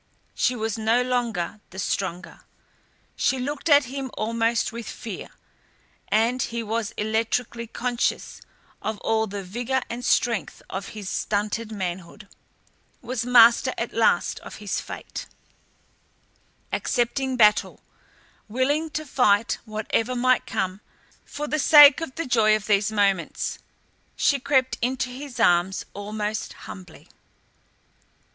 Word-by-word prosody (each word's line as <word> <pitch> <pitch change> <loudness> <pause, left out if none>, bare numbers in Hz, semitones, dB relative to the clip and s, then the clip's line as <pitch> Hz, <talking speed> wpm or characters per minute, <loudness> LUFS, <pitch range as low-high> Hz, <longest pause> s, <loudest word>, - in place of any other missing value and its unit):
She 250 - +1
was 225 -1 -3
no 225 +3 +2
longer 235 -6 -2
the 190 - -13
stronger. 190 -2 -3 0.7
She 265 - +1
looked 285 +5 -3
at 290 -1 +7
him 265 +1 -5
almost 230 +1 0
with 235 0 -7
fear, - - -7 0.8
and 230 +4 +2
he 235 0 -2
was 225 0 -2
electrically 225 +2 -1
conscious 245 +1 -2 0.4
of 220 -1 -3
all 220 0 +1
the 200 -1 -5
vigour 245 +7 -2
and 240 +1 -5
strength 235 -2 0
of 195 +1 -4
his 205 -3 -6
stunted 210 +3 -2
manhood, 190 0 -5 0.8
was 245 -1 -3
master 235 -1 +6
at - - -3
last - - +2
of - - -10
his - - -3
fate, - - -8 1.5
accepting 260 +1 0
battle, 210 -2 +4 0.7
willing 280 +8 0
to 310 0 -4
fight 225 -5 +2
whatever 220 +3 -1
might 255 0 +2
come 190 +1 -2 0.4
for 295 +1 -6
the 305 - -1
sake 295 0 +8
of 295 -5 -5
the 330 - -3
joy 220 -4 +4
of 215 -1 -4
these 210 0 +2
moments. 200 -4 0 0.6
She 280 - +2
crept 265 -1 +1
into 255 +1 -1
his 260 -1 -8
arms 180 -2 +2
almost 210 +1 -4
humbly. 180 -4 -11
230 Hz, 125 wpm, -24 LUFS, 210-255 Hz, 1.5 s, sake